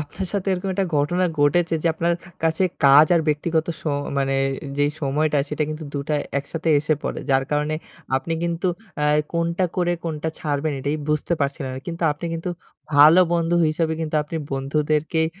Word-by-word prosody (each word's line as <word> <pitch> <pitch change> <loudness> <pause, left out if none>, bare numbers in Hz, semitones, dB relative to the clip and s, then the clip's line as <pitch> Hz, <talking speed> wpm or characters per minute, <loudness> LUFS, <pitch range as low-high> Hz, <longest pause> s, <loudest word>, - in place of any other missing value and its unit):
আপনার 150 +5 -5
সাথে 200 -1 -1
এরকম 185 +1 -2
একটা 195 -1 0
ঘটনা 175 +6 +1 0.2
ঘটেছে, 165 +3 +3
যে - - 0
আপনার 170 +1 +1 0.3
কাছে 165 +3 +2 0.2
কাজ 140 +3 +8
আর 165 - +4
ব্যক্তিগত 160 +2 0
স - - -17 0.4
মানে 135 0 0 0.4
যেই 145 0 +3
সময়টা 150 +1 +1
সেটা 150 0 -1
কিন্তু 155 +1 -5
দুটা 140 +2 -2 0.2
একসাথে 160 +4 -4
এসে 155 +1 +1
পড়ে। - - -3
যার 135 0 +3
কারণে 150 +1 0 0.4
আপনি 165 +5 -3
কিন্তু 170 +2 -1 0.3
অ্যা 150 - +1 0.3
কোনটা 170 +2 0
করে 175 -1 +1
কোনটা 160 -1 -2
ছাড়বেন 150 0 -1
এটাই 145 +3 -1
বুঝতে 150 +3 0
পারছিলেন 140 -1 -2
না। 130 - -6
কিন্তু 170 0 -5
আপনি 160 +4 -6
কিন্তু 165 +2 -3 0.4
ভালো 155 +5 +8
বন্ধু 170 0 +1
হিসেবে 160 +1 0
কিন্তু 155 -1 -1
আপনি 150 +2 -6 0.2
বন্ধুদেরকেই 150 +3 0
155 Hz, 170 wpm, -22 LUFS, 145-170 Hz, 0.4 s, কাজ